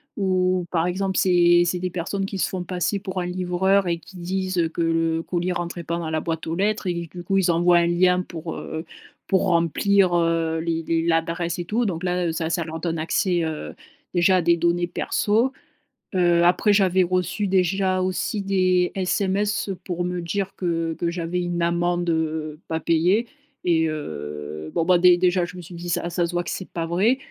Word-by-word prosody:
Où, 185 -2 +1
par 165 -2 +1
exemple, 190 +1 -1
c'est 175 -1 +5
c'est 180 +1 -1
des 180 +1 -2
personnes 190 +3 -3
qui 195 - -5
se - - +1
font 185 -2 -4
passer 180 +2 -1
pour 190 -1 -4
un 180 - -2
livreur 185 +2 +1
et 170 - 0
qui 185 +3 -14
disent, 185 +1 -2
heu, 165 -1 +2
que 165 - -4
le 165 0 +1
colis 175 +1 -2
rentrait 175 0 -4
pas 170 +1 -2
dans 160 -2 -4
la 160 - 0
boîte 165 -1 -3
aux 160 - -3
lettres 205 +3 0
et 170 -2 -2
que, 180 - -15
du 175 - -6
coup, 195 +2 0
ils 185 -2 +2
envoient 175 +1 +4
un 170 - +2
lien 180 +1 +3
pour, 170 -2 -7
heu, 160 +2 -6 0.4
pour 190 - +2
remplir, 175 +3 +3
heu, 165 -1 +1
les 165 0 -2
les 165 0 0
l'adresse 170 0 0
et 175 - -4
tout. 230 +7 0
Donc 180 -4 -3
là, 180 -1 0
heu, - - 0
ça 160 0 -2
ça 170 - 0
leur 160 0 -6
donne 165 -1 -2
accès, 175 +2 +1
heu, 160 -1 -4 0.4
déjà, 185 +1 +4
à - - +2
des 170 +1 +4
données 170 +1 +1
perso. 220 +7 +1 0.7
Heu, 175 -1 +4
après, 180 +4 +4
j'avais 190 -2 +3
reçu, 185 +3 -1
déjà 185 0 +1
aussi, 185 +3 -1
des 185 -2 +2
SMS 195 +2 0
pour 175 -1 -3
me 180 0 -2
dire 195 +3 -3
que 165 -2 -1
que 170 +1 -2
j'avais 175 0 -2
une 175 -1 -2
amende, 175 0 0
heu, 155 -1 -2
pas 160 0 -2
payée 180 +9 +2 0.4
et 160 -2 +3
heu, 75 - -6
bon, 165 - +1
ben, 180 +1 +4
dé 180 0 +6
déjà, 180 0 +2
je 180 - -11
me 180 - -8
suis 175 +1 -11
dit: 175 +1 -7
«Ça 170 0 -1
ça 175 0 0
se 170 - -7
voit 175 0 -1
que - - -5
c'est 190 - -5
pas 165 - -3
vrai». 195 +9 +2
175 Hz, 215 wpm, -23 LUFS, 165-185 Hz, 0.7 s, dé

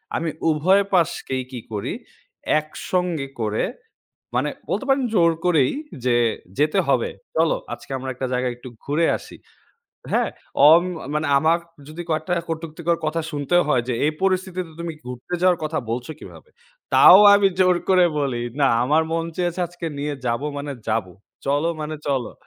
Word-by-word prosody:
আমি 165 - -1 0.2
উভয় 180 +6 +3
পাশকেই 150 -7 0
কি 125 - -5
করি 100 -1 -3 0.7
একসঙ্গে 160 0 -3
করে 110 -1 0 0.7
মানে - - +1 0.2
বলতে 270 - -1
পারেন 270 -1 +3
জোর 170 -5 +4
করেই 160 -7 +3 0.3
যে 125 -1 +3 0.4
যেতে 150 +1 +3
হবে। - - +2 0.3
চলো - - +3 0.2
আজকে - - -11
আমরা 130 0 -5
একটা 130 +1 -4
জায়গায় 125 -1 0
একটু 125 +1 -10
ঘুরে 155 +4 +1
আসি। - - -13 0.8
হ্যাঁ, - - +2 0.4
অম 165 +2 +7 0.2
আ - - -8
মানে 150 +1 0
আমার 160 +4 +3 0.3
যদি 155 +3 -7
কয়েকটা 155 +2 -1 0.2
কটুক্তিকর 165 +1 -2
কথা 160 +2 -1
শুনতেও 150 +5 +2
হয় 125 -5 +2
যে 125 - 0
এই 150 - +2
পরিস্থিতিতে 185 -2 -1
তুমি 170 -1 -4
ঘুরতে 125 +7 -8
যাওয়ার 180 -2 +3
কথা 155 +1 -1
বলছো 120 +5 -3
কীভাবে? 470 - -13 0.4
তাও 185 - +9 0.2
আমি 200 -1 +4
জোর 185 -1 +5
করে 185 -1 +6
বলি 130 -4 -1 0.2
না 135 - +5 0.2
আমার 150 +5 +3
মন 165 0 0
চেয়েছে 175 0 -1
আজকে 175 0 -8
নিয়ে 145 +1 -2
যাব 120 +1 0 0.2
মানে 145 0 -4 0.2
যাবো। 110 -4 -1 0.3
চলো 145 +4 +1
মানে 155 +1 -4
চলো, 135 -4 -1
155 Hz, 160 wpm, -22 LUFS, 135-175 Hz, 0.8 s, তাও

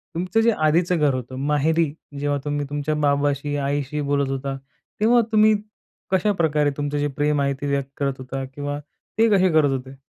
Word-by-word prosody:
तुमचं 185 +6 +1
जे 230 - +5 0.2
आधीचं 175 +3 +2
घर 145 -3 +3
होतं, 130 0 -5 0.2
माहेरी 155 +1 +2 0.3
जेव्हा 145 0 0
तुम्ही 145 0 -1
तुमच्या 145 +1 -2
बाबाशी, 145 0 +1
आईशी 145 +1 -2
बोलत 140 -1 +1
होता, 135 0 -3 0.4
तेव्हा 235 +2 +5
तुम्ही 215 0 +5 0.6
कशाप्रकारे 165 -7 +2
तुमचं 145 0 -2
जे 145 0 +1
प्रेम 145 0 +1
आहे 140 0 +1
ते 145 - -2
व्यक्त 140 -1 -1
करत 140 -1 0
होता? 130 +1 -5
किंवा 145 0 -4 0.4
ते 225 0 +4
कसे 185 0 +4
करत 155 -2 +4
होते? 130 +1 -12
145 Hz, 170 wpm, -23 LUFS, 140-160 Hz, 0.6 s, जे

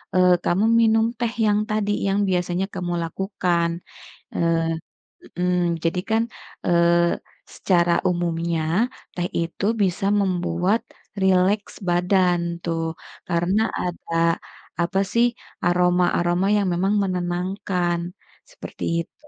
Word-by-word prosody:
eee, 180 0 +5
kamu 190 +5 +2
minum 225 -1 +4
teh 235 -2 -1
yang 205 0 +3
tadi 215 -1 0 0.2
yang 195 +1 +1
biasanya 180 0 0
kamu 180 -2 -3
lakukan, 175 -1 -1 0.7
eee, 165 -1 +2 0.8
mhm, 180 -2 +1
jadi 165 +2 0
kan, 220 +1 +3 0.4
eee, 170 0 +3 0.4
secara 175 -2 +2 0.2
umumnya 170 -1 -1 0.5
teh 175 0 -1
itu 170 +3 -3 0.2
bisa 190 0 0
membuat 180 +2 +1 0.4
rileks 190 +2 +2 0.2
badan 180 0 +3 0.2
tuh 165 -1 -1 0.5
karena 175 +4 +1 0.2
ada 175 -1 -4 0.7
apa 190 +3 0
sih 235 +1 +4 0.4
aroma-aroma 175 0 +2
yang 200 -2 +1
memang 190 +4 +1
menenangkan, 180 -1 -1 0.5
seperti - - -9 0.2
itu - - -30
180 Hz, 105 wpm, -23 LUFS, 175-195 Hz, 0.8 s, eee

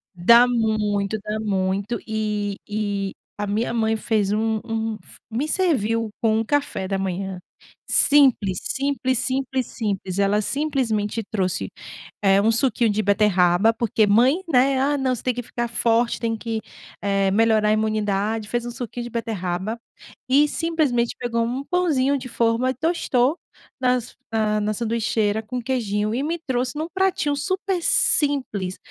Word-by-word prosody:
Dá 235 +8 +6
muito, 215 -3 0
dá 215 +1 -3
muito 200 +2 -1
e 210 -2 -2
e 205 -2 -2 0.2
a 205 0 -3
minha 215 +4 -1
mãe 225 -1 +1
fez 215 -3 0
um 220 +1 0
um 225 -1 -2 0.3
me 260 +7 -1
serviu 230 - +1
com 220 -1 +2
um - - 0
café 285 -6 -1
da 195 - 0
manhã, 190 0 -3 0.5
simples, 255 -10 +4
simples, 270 -2 -1
simples, 260 0 -1
simples, 200 -4 -3
ela 200 +1 +2
simplesmente 230 -5 -1
trouxe, 185 -4 -2 0.5
eh, 195 -1 +4
um 220 - +3
suquinho 235 0 +2
de 210 +1 +1
beterraba, 200 0 +3
porque 225 -2 +1
mãe, 250 - +4
né, 265 -2 +3
"Ah 285 +2 +1
não, 260 -2 0
você 230 - -9
tem 255 - +1
que 245 +1 -5
ficar 240 +1 -3
forte, 230 0 +1
tem 225 -1 -1
que, 225 0 -4 0.4
eh, 195 -1 +1
melhorar 220 0 +3
a - - +4
imunidade", 215 0 -1
fez 240 +1 -2
um 240 - -4
suquinho 240 -1 -6
de - - -6
beterraba 215 -2 -3 0.5
e 285 +3 +5
simplesmente 295 -8 0
pegou 235 -1 -1
um 250 +4 -2
pãozinho 285 -7 +1
de 255 -1 -8
forma 230 +2 +1
e - - 0
tostou 300 -2 +1 0.4
nas 250 -1 0 0.2
na 215 -1 +1
na 210 +1 0
sanduicheira 220 -1 0
com 245 +3 -4
queijinho 215 -4 -1
e 265 - -1
me 335 +3 -2
trouxe 255 +2 -1
em - - -1
um - - -4
pratinho 380 -6 +1
super 375 +5 -2
simples, 260 - +1
225 Hz, 155 wpm, -23 LUFS, 210-260 Hz, 0.5 s, Dá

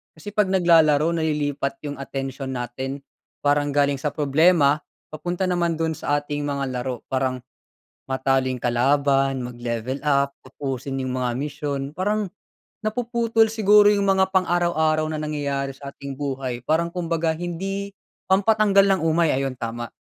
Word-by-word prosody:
kasi 180 +6 -9
pag 205 -3 +2
naglalaro 165 -3 +4
nalilipat 145 -3 -1
yung 145 - -4
atensyon 135 0 -5
natin. 130 +3 -4 0.4
Parang 145 0 +1
galing 145 0 +2
sa 150 0 -2
problema 150 0 +3 0.2
papunta 175 +4 -3
naman 170 -2 0
dun 160 -1 0
sa 145 +1 0
ating 145 0 -4
mga 140 -1 -2
laro 125 -1 -3
parang 130 -1 -1 0.7
matalo 130 0 +1
yung 130 -2 -2
kalaban, 135 +2 +2
mag-level 120 +1 -4
up 140 -1 +2
tapusin 135 0 -4
yung 130 - -3
mga 125 -1 0
misyon. 145 0 -3 0.2
Parang 205 +2 0 0.5
napuputol 230 0 +1
siguro 210 -1 +5
yung 200 -1 +1
mga 190 0 +2
pang-araw-araw 170 -4 +2
na 155 - -3
nangyayari 140 -2 -2
sa 140 0 -9
ating 140 -1 -8
buhay 130 -3 -4
parang 170 +2 +1
kumbaga 170 -2 -1
hindi 195 +4 -4 0.3
pampatanggal 200 0 +4
ng - - -5
umay, 160 0 +3
ayon 135 -1 -1
tama. 120 -1 -5
145 Hz, 140 wpm, -23 LUFS, 135-175 Hz, 0.7 s, siguro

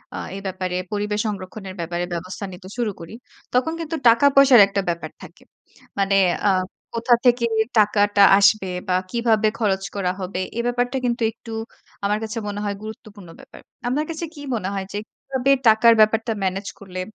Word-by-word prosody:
আ - - -4 0.2
এ - - -5
ব্যাপারে 185 -1 -3 0.2
পরিবেশ 210 0 -1
সংরক্ষণের 195 -1 -6
ব্যাপারে 170 +1 -3
ব্যবস্থা 185 +4 -5
নিতে 185 +1 -11
শুরু 235 -3 0
করি। 165 +4 -10 0.4
তখন 255 +6 +1
কিন্তু 325 0 -4
টাকা 230 +4 +5
পয়সার 275 -4 +8
একটা 200 0 -1
ব্যাপার 170 0 -4
থাকে। - - -14 0.6
মানে 195 0 +2 0.3
আ - - +5 0.5
কোথা 235 +1 +3
থেকে 240 -1 +4 0.3
টাকাটা 205 -1 +4 0.2
আসবে? 200 -1 +4 0.2
বা 180 - +1 0.2
কিভাবে 225 -2 +2
খরচ 195 -4 0
করা 185 -3 0
হবে? 185 0 -3 0.2
এ - - 0
ব্যাপারটা 245 +2 -1
কিন্তু 240 0 -1
একটু 225 +1 -13 0.5
আমার 210 +1 +1
কাছে 220 +1 -5
মনে 205 0 -4
হয় 205 -1 -2
গুরুত্বপূর্ণ 215 -4 -10
ব্যাপার। - - -14 0.3
আপনার 285 +5 0
কাছে 330 +1 -4
কি 290 - -10
মনে 195 -4 -3
হয়? 195 -1 -3
যে - - -3
কিভাবে 265 0 -2 0.2
টাকার 225 +1 +6
ব্যাপারটা 225 +1 +3
মেনেজ 195 +1 -2
করলে 185 -2 -7
210 Hz, 170 wpm, -22 LUFS, 190-235 Hz, 0.6 s, পয়সার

